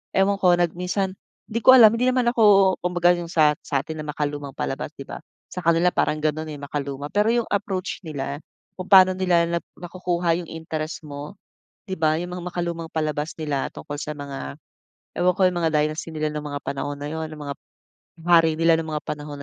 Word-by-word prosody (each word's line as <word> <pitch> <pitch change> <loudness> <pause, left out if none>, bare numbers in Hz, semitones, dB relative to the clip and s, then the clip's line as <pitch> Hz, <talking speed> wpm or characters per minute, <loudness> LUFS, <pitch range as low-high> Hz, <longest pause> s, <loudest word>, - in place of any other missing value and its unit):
ewan 195 +1 +2
ko 180 -1 +5
nag 175 -2 +2
minsan,' 190 +1 -1 0.3
di 230 +2 -3
ko 260 +3 +8
alam, 220 -3 +9
hindi 245 +2 +1
naman 255 -1 +2
ako, 200 -5 +5
kumbaga 175 0 +3
yung 170 - -5
sa 155 -3 +4
sa'tin 150 +3 -3
na 150 - -6
makalumang 145 -2 -4
palabas, 145 +3 -4
'di 140 - -8
ba? - - -8 0.3
Sa 180 - -7
kanila 170 +1 +3
parang 155 - +1
gano'n 155 +1 -1
eh, 145 - -7
makaluma, 140 0 -4
pero 210 +6 +2
yung 235 -1 +1
approach 195 -2 -3
nila, 140 -3 -4 0.4
kung 185 0 -8
pa'no 185 -1 +8
nila 175 -2 +2
nap 170 0 -2 0.2
nakukuha 175 -1 -1
yung - - -12
interest 160 -1 -5
mo, 145 +7 -8 0.4
'di 190 -3 -6
ba, 155 -1 +3
yung 175 +2 -4
mga 180 -1 -6
makalumang 170 -1 -3
palabas 155 -1 -2
nila 150 -4 -2
tungkol 145 0 -6
sa 150 0 -5
mga, 140 - -7 0.6
ewan 180 +1 +2
ko, - - -1
yung 180 -1 +1
mga 165 - +2
dynasty 155 +1 -1
nila 155 -1 -3
ng 150 - -3
mga 145 -1 -5
panahon 140 +1 -3
na 145 - -6
'yon, 160 0 -4
ng 155 - -9
mangap 145 -1 -6 0.7
hari 165 -2 +4
nila 165 0 +3
ng 160 - -6
mga 150 -1 -3
panahon 150 0 -6
160 Hz, 200 wpm, -23 LUFS, 150-180 Hz, 0.7 s, alam